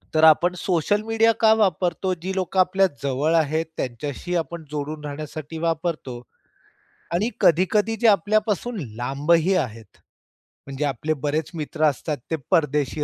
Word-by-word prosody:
तर 155 - +3
आपण 160 +3 +6
social 180 +3 0
media 225 +1 +3
का 220 -1 +6
वापरतो? 185 -3 +1
जी 185 +3 -5
लोकं 190 0 -1
आपल्या 190 +1 +4 0.2
जवळ 140 +4 0
आहेत 160 0 +1
त्यांच्याशी 145 +8 -4
आपण 170 -1 -3
जोडून 150 +1 -4
राहण्यासाठी 155 +1 -6
वापरतो. 160 -6 -2 0.9
आणि 210 +7 +1
कधी-कधी 205 +6 +3
जे 235 - +5
आपल्यापासून 215 +3 +1 0.2
लांबही 150 - +1
आहेत. 115 - -4 0.7
म्हणजे 140 +2 -3
आपले 145 +3 -1
बरेच 150 +1 -1
मित्र 155 0 -4
असतात 150 +1 0
ते - - +2 0.2
परदेशी 150 -3 +1
160 Hz, 135 wpm, -23 LUFS, 150-185 Hz, 0.9 s, आपण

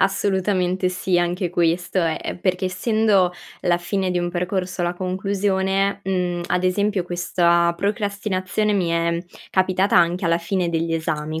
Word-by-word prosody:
Assolutamente 190 -1 +1
sì 180 0 0
anche 175 +1 -1
questo 175 +2 0
è 165 -2 +1
ehm, - - -5
perché 185 0 0
essendo 200 -1 +2 0.3
la 175 -1 +2
fine 185 +1 -1
di 175 - 0
un 175 - -2
percorso 180 0 -2
alla 175 0 0
conclusione, 195 +1 0
mhmm, 180 -2 -1
ad 180 - 0
esempio 200 +1 +1
questa 170 -1 +2
procrastinazione 200 0 -1
mi 180 -4 +1
è 170 0 +1 0.3
capitata 185 +1 +2
anche 175 +2 +2
alla 170 0 +2
fine 175 +1 -1
degli 165 0 -1
esami. 155 -1 -2
180 Hz, 145 wpm, -22 LUFS, 175-195 Hz, 0.3 s, essendo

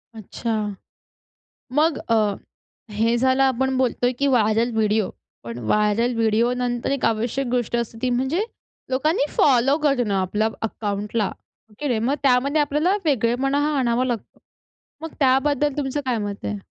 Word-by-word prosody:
अच्छा. 225 +2 -4 1.2
मग 305 +2 +2
अ, 230 - +4 0.8
हे 225 +3 +1
झालं 260 +2 +3
आपण 265 0 +1
बोलतोय 250 -1 +1
की 280 - +2
व्हायरल 230 -2 +2
व्हिडिओ. 215 -2 +1 0.3
पण 115 0 -7
व्हायरल 210 +3 +2
व्हिडिओ 230 +2 +2
नंतर 245 +1 -1
एक 275 -2 0
आवश्यक 235 +4 0
गोष्ट 240 -1 -1
असते 235 -1 -4
ती 255 - +1
म्हणजे 265 - 0 0.5
लोकांनी 285 +5 +1
फॉलो 270 +1 +4
करणं 250 -8 +2
आपल्याला 210 +4 0
अकाउंटला 210 +1 -2
हो 220 - -15
की 295 - -2
नाही, 240 -5 +1
मग 250 +6 0
त्यामध्ये 275 +3 +3
आपल्याला 300 +6 +1
वेगळेपणा 270 0 +1 0.2
आणावा 245 -1 +1
लागतो. 240 -4 -4 0.6
मग 325 -1 -7
त्याबद्दल 280 +1 +2
तुमचं 290 0 -2
काय 250 -2 0
मत 205 -1 -5
आहे? 210 - -2
245 Hz, 145 wpm, -22 LUFS, 225-270 Hz, 1.2 s, अ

